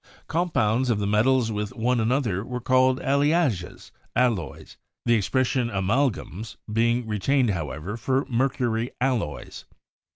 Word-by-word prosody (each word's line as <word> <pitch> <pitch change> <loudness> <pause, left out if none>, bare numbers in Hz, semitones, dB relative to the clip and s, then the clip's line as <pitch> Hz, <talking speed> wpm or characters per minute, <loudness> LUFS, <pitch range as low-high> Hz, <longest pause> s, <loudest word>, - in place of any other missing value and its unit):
Compounds 130 -8 +1
of 115 - +2
the 105 - -1
metals 115 +3 +2
with 105 +3 -4
one 125 +1 +1
another 110 -4 0
were 125 +1 -5
called 130 +1 +3
'alliages* 140 - 0 0.2
(alloys), 115 - -1 0.3
the 120 - +4
expression 125 +3 +1
'amalgames' 110 0 -1 0.2
being 115 +2 +2
re 105 -1 -2
tained, 130 +1 +2
however, 75 - -4
for 130 +3 0
mercury 120 -2 0
alloys. 125 - -2
120 Hz, 125 wpm, -25 LUFS, 105-130 Hz, 0.3 s, the